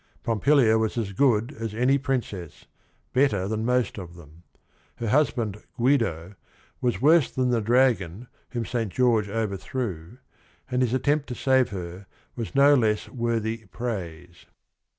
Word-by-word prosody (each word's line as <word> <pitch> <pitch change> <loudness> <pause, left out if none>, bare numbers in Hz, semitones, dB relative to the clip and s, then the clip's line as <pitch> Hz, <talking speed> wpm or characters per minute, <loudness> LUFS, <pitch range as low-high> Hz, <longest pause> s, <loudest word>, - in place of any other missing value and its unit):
Pompilia 115 0 +3
was 110 +1 -1
as 105 -4 -2
good 120 +2 +2
as 115 -2 -4
any 130 +4 +3
princess, 120 - -4 0.5
better 125 -9 +2
than 110 +1 -2
most 125 -3 0
of 85 -2 -9
them. 80 -1 -15 0.5
Her 115 - -3
husband, 115 -6 +1 0.2
Guido, 115 - +1 0.5
was 125 0 -1
worse 155 -1 +5
than 125 -1 0
the 120 -2 +1
dragon 115 -3 +1 0.2
whom 120 -2 -3
Saint 115 -4 -2
George 115 -4 +2
overthrew, 105 -2 -4 0.5
and 125 0 +1
his 125 0 +1
attempt 145 +3 +1
to 125 - -5
save 130 -1 +2
her 90 0 -7 0.3
was 120 +3 -6
no 140 +1 +6
less 110 -6 +1
worthy 115 -2 -2
praise. 90 -7 -6
115 Hz, 140 wpm, -25 LUFS, 100-130 Hz, 0.5 s, no